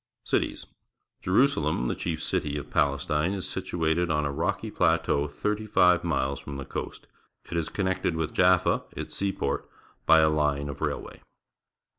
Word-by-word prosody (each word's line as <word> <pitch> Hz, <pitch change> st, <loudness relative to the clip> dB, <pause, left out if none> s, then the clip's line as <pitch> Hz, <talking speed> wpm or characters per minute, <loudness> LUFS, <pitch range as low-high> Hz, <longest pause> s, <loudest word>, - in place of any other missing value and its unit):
Cities. -, -, -1 dB, 0.3 s
— -, -, -54 dB
J -, -, -6 dB
erusalcm, 90 Hz, -, +2 dB
the -, -, 0 dB
chief 80 Hz, -2 st, -3 dB
city 75 Hz, -1 st, -1 dB
of 70 Hz, -, -7 dB
Pales 70 Hz, 0 st, +1 dB
tine, 75 Hz, +5 st, +1 dB
is 95 Hz, -2 st, -4 dB
situated 85 Hz, +1 st, -1 dB
on 75 Hz, -2 st, +1 dB
a 70 Hz, -, -1 dB
rocky 70 Hz, -, -2 dB
plateau 70 Hz, +1 st, +2 dB
thirty 105 Hz, +8 st, -2 dB
five 90 Hz, -4 st, +4 dB
miles 70 Hz, -5 st, -1 dB
from 70 Hz, -1 st, -7 dB
the 70 Hz, -, -6 dB
coast. -, -, -6 dB, 0.5 s
It -, -, -3 dB
is 85 Hz, -1 st, -1 dB
connected 95 Hz, -3 st, -1 dB
with 80 Hz, -1 st, -2 dB
Jaffa, 90 Hz, -1 st, +4 dB, 0.2 s
its -, -, -6 dB
seaport, 95 Hz, -8 st, -2 dB, 0.4 s
by 80 Hz, 0 st, +7 dB
a 80 Hz, -, +5 dB
line 75 Hz, -2 st, 0 dB
of 70 Hz, -, -7 dB
railway. -, -, -4 dB
80 Hz, 170 wpm, -27 LUFS, 70-90 Hz, 0.5 s, by